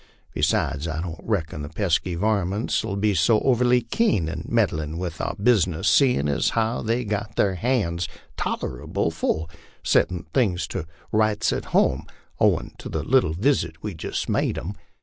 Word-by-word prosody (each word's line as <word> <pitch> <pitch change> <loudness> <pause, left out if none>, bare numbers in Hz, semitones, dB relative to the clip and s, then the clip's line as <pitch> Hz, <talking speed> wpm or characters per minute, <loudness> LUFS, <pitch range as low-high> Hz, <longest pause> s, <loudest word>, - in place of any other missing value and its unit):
Besides, 75 +4 0
I 80 -1 -3
don't 85 -1 -5
reckon 80 -9 -2
the 75 - -6
pesky 90 0 0
varmints 100 +3 0
'11 100 -3 -3
be 105 -1 +3
so 95 +6 +4
overly 125 -1 +3
keen 115 - +1
in 80 0 -5
meddlin' 80 -9 0
with 85 -3 -4
our - - -2
business, 100 -5 +2
seein' 125 - +4
as 75 +1 +1
how 115 +1 +1
they've 115 +1 -1
got 105 +1 -3
their 100 - +2
han's 90 -6 0 0.3
tolerable 60 - -2
full 80 +1 -1 0.4
settin' 90 -2 +2
things 100 -8 +2
to 90 -5 -4 0.2
rights 110 -1 +2
at - - -3
home, - - +1 0.3
owin' - - +2
to - - -7
the - - -2
little 75 - +3
visit 85 - 0
we've 100 -6 -5
jist 80 - -3
made - - 0
'em. 95 +6 -4
95 Hz, 165 wpm, -24 LUFS, 80-110 Hz, 0.4 s, so